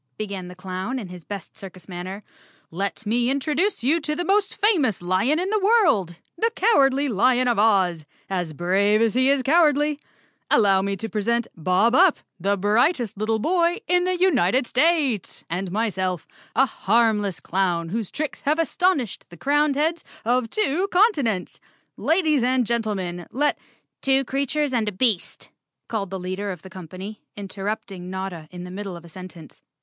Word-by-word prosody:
began 200 Hz, -4 st, -5 dB
the 180 Hz, -, -10 dB
clown 185 Hz, +7 st, -4 dB
in 210 Hz, -8 st, -6 dB
his 180 Hz, -2 st, -10 dB
best 200 Hz, +1 st, -8 dB
circus 190 Hz, -5 st, -11 dB
manner, 185 Hz, +3 st, -7 dB, 0.5 s
"Let 200 Hz, +5 st, -3 dB
me 240 Hz, +3 st, +1 dB
introduce 300 Hz, -, 0 dB
you 300 Hz, +7 st, +3 dB
to 300 Hz, 0 st, -2 dB
the 350 Hz, -, -3 dB
most 400 Hz, +1 st, +1 dB
famous 330 Hz, -, +2 dB
lion 190 Hz, -, +1 dB
in 375 Hz, +3 st, -2 dB
the 430 Hz, -, +2 dB
world, 380 Hz, -, +3 dB, 0.2 s
the 450 Hz, +7 st, +1 dB
Cowardly 280 Hz, -, +3 dB
Lion 250 Hz, +2 st, +2 dB
of 235 Hz, -4 st, +1 dB
Oz, 190 Hz, -7 st, +3 dB, 0.2 s
as 175 Hz, -4 st, -3 dB
brave 195 Hz, +6 st, +2 dB
as 225 Hz, -1 st, +2 dB
he 260 Hz, +2 st, +3 dB
is 275 Hz, -2 st, +2 dB
cowardly; 295 Hz, -1 st, +3 dB, 0.5 s
allow 195 Hz, -3 st, +4 dB
me 200 Hz, 0 st, -2 dB
to 225 Hz, -, -4 dB
present 230 Hz, +2 st, -1 dB
Bob 185 Hz, +8 st, +2 dB
Up, 355 Hz, +3 st, +5 dB, 0.2 s
the 200 Hz, +3 st, 0 dB
brightest 230 Hz, -, +1 dB
little 215 Hz, +2 st, 0 dB
boy 345 Hz, -, +1 dB
in 360 Hz, 0 st, +3 dB
the 365 Hz, 0 st, 0 dB
United 260 Hz, -, +2 dB
States, 275 Hz, -, +1 dB
and 185 Hz, +2 st, -2 dB
my¬ 215 Hz, +2 st, -1 dB
self, 185 Hz, -3 st, -2 dB, 0.3 s
a 270 Hz, -, +5 dB
harmless 215 Hz, -4 st, +1 dB
clown 175 Hz, -3 st, -1 dB
whose 220 Hz, +1 st, -3 dB
tricks 305 Hz, -1 st, -4 dB
have 300 Hz, +3 st, +1 dB
astonished 330 Hz, -, 0 dB
the 175 Hz, -, -13 dB
crowned 290 Hz, -, +2 dB
heads 315 Hz, +3 st, 0 dB, 0.2 s
of 245 Hz, 0 st, +1 dB
two 375 Hz, -, 0 dB
continents. 290 Hz, -, +1 dB, 0.4 s
Ladies 315 Hz, -6 st, +2 dB
and 255 Hz, 0 st, +2 dB
gentlemen, 200 Hz, -7 st, -2 dB
let—" 295 Hz, +3 st, 0 dB
4 -, -, -31 dB, 0.4 s
'Two 270 Hz, 0 st, +3 dB
creatures 280 Hz, +2 st, -1 dB
and 225 Hz, -3 st, +1 dB
a -, -, -6 dB
beast," 205 Hz, -2 st, -1 dB, 0.4 s
called 205 Hz, -4 st, -3 dB
the 190 Hz, -, -4 dB
leader 185 Hz, +3 st, -4 dB
of 180 Hz, -4 st, -6 dB
the 190 Hz, -, -12 dB
company, 185 Hz, +4 st, -9 dB, 0.2 s
interrupting 195 Hz, -2 st, -5 dB
Notta 190 Hz, -4 st, -5 dB
in 180 Hz, -1 st, -9 dB
the 180 Hz, -, -8 dB
middle 195 Hz, -1 st, -6 dB
of 170 Hz, -, -13 dB
a -, -, -11 dB
sen¬ 185 Hz, +2 st, -9 dB
tence. 165 Hz, -3 st, -15 dB
220 Hz, 175 wpm, -23 LUFS, 190-290 Hz, 0.5 s, Up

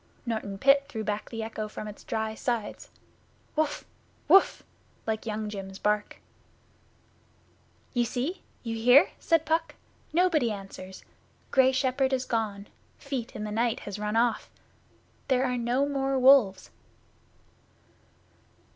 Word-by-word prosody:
Norton 220 Hz, -4 st, -3 dB
Pit 275 Hz, +5 st, +4 dB
threw 220 Hz, -6 st, -4 dB
back 210 Hz, 0 st, -3 dB
the 225 Hz, -1 st, -4 dB
echo 220 Hz, -1 st, -4 dB
from 215 Hz, 0 st, -7 dB
its 210 Hz, -, -10 dB
dry 220 Hz, 0 st, -2 dB
sides 225 Hz, -1 st, -3 dB, 0.7 s
'Wuff!' 300 Hz, -1 st, -1 dB, 0.4 s
Wuff!' 390 Hz, -, +5 dB, 0.4 s
like 220 Hz, 0 st, -3 dB
Young 215 Hz, 0 st, -3 dB
jim's 195 Hz, -2 st, -7 dB
bark. 210 Hz, 0 st, -1 dB, 1.8 s
'You 245 Hz, -2 st, +2 dB
see? 255 Hz, -, -3 dB, 0.2 s
You 230 Hz, -1 st, -3 dB
hear?' 250 Hz, +7 st, +6 dB
said 330 Hz, -2 st, +2 dB
Puck. 320 Hz, +1 st, 0 dB, 0.4 s
'Nobody 330 Hz, -7 st, +3 dB
answers. 195 Hz, -2 st, -8 dB, 0.5 s
Grey 265 Hz, -1 st, +5 dB
Shepherd 265 Hz, 0 st, +1 dB
is 260 Hz, 0 st, 0 dB
gone. 210 Hz, -3 st, -2 dB, 0.3 s
Feet 270 Hz, -5 st, -5 dB
in 210 Hz, -, -4 dB
the 210 Hz, -, -4 dB
Night 230 Hz, +2 st, 0 dB
has 205 Hz, 0 st, -6 dB
run 210 Hz, +1 st, -2 dB
off. 230 Hz, -1 st, +1 dB, 0.8 s
There 260 Hz, -1 st, +2 dB
are 250 Hz, -1 st, 0 dB
no 245 Hz, +3 st, +1 dB
more 270 Hz, -1 st, 0 dB
wolves. 255 Hz, -7 st, +5 dB
235 Hz, 130 wpm, -28 LUFS, 215-270 Hz, 1.8 s, hear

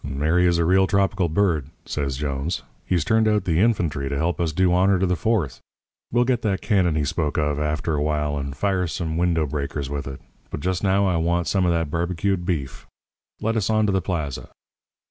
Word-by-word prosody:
"'Mary 80 Hz, +6 st, +1 dB
is 85 Hz, -1 st, +2 dB
a 85 Hz, -, +2 dB
real 95 Hz, +2 st, +4 dB
tropical 100 Hz, -2 st, +1 dB
bird,' 80 Hz, -5 st, +1 dB, 0.2 s
says 70 Hz, -3 st, -3 dB
Jones. 70 Hz, +3 st, -3 dB, 0.2 s
'He's 85 Hz, -5 st, +1 dB
turned 110 Hz, 0 st, +3 dB
out 105 Hz, -2 st, +1 dB
the 80 Hz, -2 st, +1 dB
infantry 85 Hz, -11 st, +1 dB
to 70 Hz, -, -2 dB
help 85 Hz, +4 st, -1 dB
us 85 Hz, -2 st, 0 dB
do 90 Hz, +2 st, +2 dB
honour 95 Hz, +2 st, +4 dB
to 95 Hz, -, +1 dB
the 90 Hz, 0 st, +1 dB
Fourth. 90 Hz, -, -1 dB, 0.5 s
We'll 120 Hz, +1 st, +3 dB
get 125 Hz, -1 st, 0 dB
that 100 Hz, -4 st, 0 dB
cannon 95 Hz, -7 st, +1 dB
he 75 Hz, -2 st, 0 dB
spoke 75 Hz, 0 st, -1 dB
of 75 Hz, -1 st, 0 dB
after 75 Hz, +2 st, -1 dB
a 75 Hz, -, 0 dB
while 75 Hz, -1 st, 0 dB
and 70 Hz, -1 st, -5 dB
fire 95 Hz, -3 st, 0 dB
some 80 Hz, -1 st, -3 dB
window 85 Hz, -2 st, +1 dB
breakers 70 Hz, -1 st, -4 dB
with 70 Hz, -1 st, -4 dB
it. 70 Hz, -1 st, -7 dB, 0.3 s
But -, -, -5 dB
just 90 Hz, +2 st, -1 dB
now 100 Hz, 0 st, +3 dB
I 90 Hz, -3 st, +1 dB
want 85 Hz, +1 st, +1 dB
some 95 Hz, -3 st, +1 dB
of -, -, +3 dB
that 80 Hz, -3 st, -1 dB
barbecued 90 Hz, +2 st, -1 dB
beef. 70 Hz, -8 st, -3 dB, 0.5 s
Let 115 Hz, +2 st, 0 dB
us 110 Hz, -2 st, 0 dB
on 110 Hz, -1 st, +3 dB
to 100 Hz, -, +1 dB
the 95 Hz, 0 st, +1 dB
plaza.' 80 Hz, -7 st, -3 dB
85 Hz, 215 wpm, -23 LUFS, 75-95 Hz, 0.5 s, real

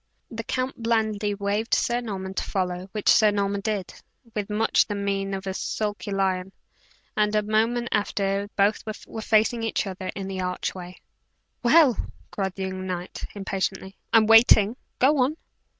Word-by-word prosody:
The 230 Hz, 0 st, -5 dB
count 255 Hz, +1 st, -3 dB
blandly 220 Hz, -3 st, 0 dB
waved 205 Hz, +3 st, 0 dB
Sir 240 Hz, 0 st, 0 dB
Norman 190 Hz, -4 st, -5 dB
to -, -, -2 dB
follow, 185 Hz, -1 st, -3 dB
which 210 Hz, -1 st, -5 dB
Sir 215 Hz, -1 st, +6 dB
Norman 200 Hz, -1 st, -1 dB
did, 210 Hz, -3 st, -3 dB, 0.4 s
with 210 Hz, -1 st, -3 dB
much 215 Hz, +2 st, +2 dB
the 205 Hz, -, -3 dB
mein 195 Hz, -1 st, -1 dB
of 190 Hz, +1 st, -6 dB
a 190 Hz, -, -2 dB
sulky 205 Hz, +1 st, -3 dB
lion; 190 Hz, -1 st, 0 dB, 0.6 s
and, 210 Hz, 0 st, +2 dB
a 210 Hz, -, +2 dB
moment 225 Hz, +3 st, +1 dB
after, 200 Hz, -1 st, 0 dB
both 205 Hz, +1 st, +2 dB, 0.2 s
were 220 Hz, -, -7 dB
facing 220 Hz, +2 st, +2 dB
each 225 Hz, -1 st, -1 dB
other 190 Hz, -1 st, -6 dB
within 195 Hz, 0 st, -5 dB
the 190 Hz, -1 st, -4 dB
archway. 180 Hz, 0 st, -4 dB, 0.6 s
"Well!" 270 Hz, 0 st, +6 dB, 0.4 s
cried 190 Hz, -2 st, -3 dB
the 195 Hz, -, -4 dB
young 185 Hz, 0 st, -4 dB
knight, 180 Hz, -1 st, -5 dB
impatiently; 195 Hz, -1 st, -3 dB, 0.2 s
"I -, -, +6 dB
am 220 Hz, -, +5 dB
waiting. 225 Hz, -1 st, +6 dB, 0.2 s
Go 280 Hz, +3 st, +4 dB
on!" 270 Hz, +5 st, +2 dB
205 Hz, 165 wpm, -25 LUFS, 195-225 Hz, 0.6 s, Sir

